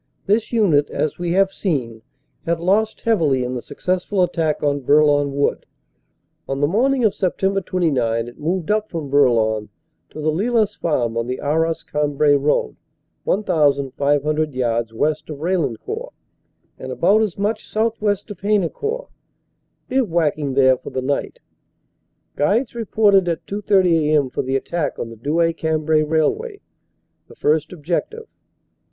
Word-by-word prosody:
This 210 +3 +1
unit, 180 -11 +3
as 155 - -2
we 175 -1 -1
have 195 +1 +3
seen, 125 - -2 0.5
had 170 0 0
lost 205 +5 +1
heavily 155 - +2
in 125 +1 -3
the 125 - -4
successful 185 - -1
attack 165 -4 -1
on 145 -1 +1
Bourlon 145 +1 +3
Wood. 140 - 0 0.8
On 135 0 -2
the 145 - +3
morning 250 - +1
of 210 - +3
Sept. 195 0 0
29 125 -12 0
it 120 - -12
moved 170 +4 -1
up 215 0 0
from 155 -5 -5
Bourlon 110 -6 +2 0.4
to - - -10
the 155 +1 0
Lillas 215 +4 +1
farm 120 -8 -1
on 115 0 -1
the 125 +1 -3
Arras 160 +3 0
Cambrai 150 0 +1
road 140 - +1 0.5
1,500 145 -4 +1
yards 115 -2 -1
west 150 +8 -1
of 150 - -6
Raillencourt 180 - -3 0.7
and - - -6
about 215 +3 +3
as 210 -5 -1
much 210 +2 -2
southwest 215 -2 -1
of 195 - -9
Haynecourt, 215 - -1 0.8
bivouacking 160 - 0
there 130 -2 +4
for - - -8
the 130 - -3
night. 140 +2 -2 0.9
Guides 220 - +1
reported 210 -4 +2
at 170 -2 -2
2.30 195 -2 +2 0.2
a.m. 145 -4 +2
for - - -1
the 130 +1 -2
attack 160 +3 -2
on 115 - -5
the - - -9
Douai 160 +8 +1
Cambrai 160 -1 +1
railway, 160 - 0 0.7
the - - -15
first 155 0 +1
objec 170 0 -2
tive. 450 0 -10
160 Hz, 145 wpm, -20 LUFS, 140-200 Hz, 0.9 s, there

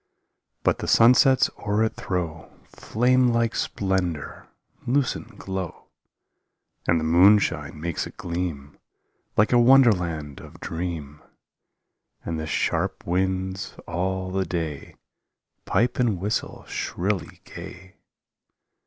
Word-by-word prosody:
But - - +2
the - - -4
sunsets 125 +3 +6
o'er 105 0 +1
it 110 - -1
throw 85 -4 -4
Flame 125 +3 +1
like 115 -1 +1
splendor, 95 -6 -2 0.4
lucent 135 +1 -1
glow, 95 -2 -6 1.0
And 85 -1 +3
the - - -3
moonshine 85 -3 +4
makes 85 +1 -3
it - - -14
gleam 85 -5 -4 0.6
Like 105 +4 +4
a 120 - +6
wonderland 90 - +4
of - - -13
dream, 80 -4 -5 1.0
And 80 -1 -3
the 80 - -4
sharp - - -1
winds 95 +1 -1
all 95 +2 -2
the 95 0 0
day 80 -6 -4 0.7
Pipe 120 +2 +1
and 115 -7 +1
whistle 105 +4 -3
shrilly 95 +2 -3
gay. 90 +1 -11
95 Hz, 110 wpm, -24 LUFS, 85-110 Hz, 1.0 s, sunsets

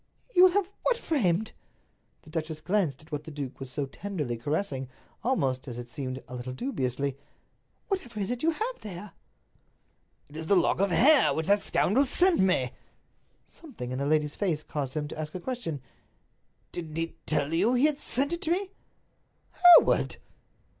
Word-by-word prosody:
"You 365 -1 +8
will 370 - +6
have 400 -2 +2
what - - +1
framed?" 220 - 0 0.7
The 155 - -15
duchess 160 -1 -3
glanced 175 -8 0
at 160 - -21
what 150 0 -4
the - - -7
duke 140 -4 -6
was 135 -1 -6
so 140 +2 -2
tenderly 150 -4 -4
caressing, 135 - -2 0.3
almost, 135 - 0
as 120 -2 -6
it 120 0 -7
seemed, 130 0 -5
a - - -10
little 125 +1 -5
dubiously. 135 - -2 0.7
"Whatever 250 - -3
is 195 +2 -1
it 245 0 -3
you 325 - +3
have 445 +10 -3
there?" 205 0 -8 1.2
"It 145 - -16
is 160 0 -5
the 200 - +5
lock 180 -1 +3
of 200 +1 +2
hair 270 - +6
which 160 - -1
that 200 +2 +3
scoundrel 260 +9 +2
sent 355 +6 +3
me." 180 -10 +2 0.7
Something 230 - -9
in 130 - -3
the 140 - -1
lady's 150 -1 +1
face 165 -7 -1
caused 140 -3 -4
him 150 -1 -2
to 155 - -8
ask 155 +1 -5
a - - -3
question; 175 - -4 0.9
"Didn't 160 -3 -6
he 165 0 -2
tell 155 0 0
you 205 +9 +3
he 250 +4 +4
had 300 -1 +1
sent 280 +5 -1
it 340 - -3
to 320 - -1
me?" 380 +2 0 0.8
"Hereward!" 355 -2 +6
170 Hz, 180 wpm, -28 LUFS, -, 1.2 s, You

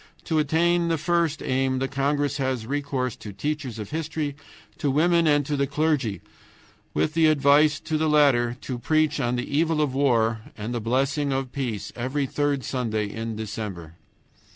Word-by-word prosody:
To 160 -2 0
attain 170 +3 +2
the 165 -1 +1
first 170 -1 0
aim 130 0 0
the 135 +1 -1
congress 145 +1 0
has 130 -4 -1
recourse 135 -2 -2
to 105 - -8
teachers 135 +2 -3
of 105 -2 -7
history, 155 -2 -3 0.4
to 145 - 0
women, 165 +4 +3
and 145 -2 +3
to 145 - -1
the 140 0 +1
clergy, 140 - 0 0.7
with 155 - +1
the 165 -1 +4
advice 145 0 +4
to 155 -1 -2
the 155 0 +2
latter 130 -5 +3
to 125 -2 -5
preach 155 +2 +1
on 120 -2 0
the 125 0 -2
evil 160 0 +2
of 145 -4 +1
war 115 -5 +2 0.2
and 110 +3 -4
the 120 - -2
blessing 135 +5 0
of 135 -1 -2
peace 125 -7 -4
every 130 +4 -1
third 145 0 -1
Sunday 110 -4 -1
in 115 0 -4
December. 105 -6 -6
140 Hz, 175 wpm, -25 LUFS, 120-150 Hz, 0.7 s, the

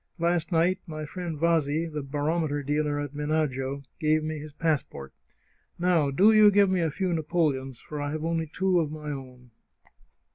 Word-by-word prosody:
Last 170 0 0
night 175 +3 +2
my 155 -1 -5
friend 170 0 -5
Vasi, 165 -1 +2
the 155 -2 -4
barometer 145 +1 -1
dealer 145 +1 0
at 145 -1 -5
Menagio, 145 -2 -1 0.2
gave 155 -1 +2
me 155 0 -3
his 150 +1 -9
passport. 145 - -2 0.6
Now 175 -5 +2
do 190 +11 +5
you 215 -1 +8
give 200 -1 +4
me 185 -2 +1
a 165 - +1
few 180 +4 -1
napoleons, 150 -6 -1
for 150 -1 -7
I 145 - -2
have 155 +1 -3
only 165 -1 -1
two 180 +3 +1
of 155 -3 -1
my 150 -1 -6
own. 125 -3 -9
155 Hz, 175 wpm, -27 LUFS, 145-170 Hz, 0.6 s, you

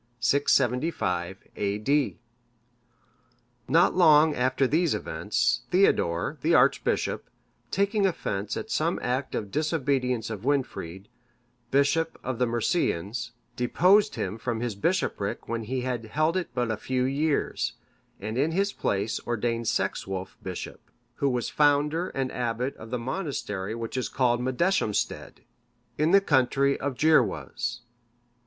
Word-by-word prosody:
[675 120 - +1 0.2
A.D.] 105 +8 0 1.5
Not 165 +7 +4
long 155 -3 +6
after 130 +1 +1
these 160 +4 +2
events, 100 +9 0
Theodore, 90 - +2
the - - +3
archbishop, - - +2 0.4
taking 200 +1 +2
offence 100 - -3
at - - -6
some - - +1
act 130 +2 -1
of 100 -2 -4
disobedience 135 -7 0
of 105 -3 -5
Wynfrid, 120 -9 -2 0.6
bishop 140 +5 +1
of 130 -2 -3
the 125 - +2
Mercians,(574) 120 - -2
deposed 185 - +3
him 100 +4 -3
from 115 0 -2
his 120 -1 -2
bishopric 105 - -1
when 115 -1 -3
he 130 +3 -2
had 125 -2 -3
held 155 +9 0
it 185 -2 -1
but 120 -2 0
a 110 - -2
few 130 +2 -1
years, 140 +3 0 0.5
and 110 +5 -3
in 155 +4 +1
his 200 +3 +1
place 100 +3 -1
ordained 115 0 -1
Sexwulf 95 -2 -2
bishop,(575) 90 -2 -7 0.3
who 140 - +1
was 125 -2 -1
founder 150 +4 +2
and 135 -1 -2
abbot 125 +2 -2
of 110 - -10
the 125 - -2
monastery 115 - -3
which 115 +1 -5
is 125 -4 -1
called 120 -1 +1
Medeshamstead,(576) 130 - -1 0.6
in 155 +1 +3
the 200 +2 +6
country 140 -3 +2
of 140 0 -2
the 150 - -1
Gyrwas. 160 -1 +1
125 Hz, 130 wpm, -27 LUFS, 110-150 Hz, 1.5 s, long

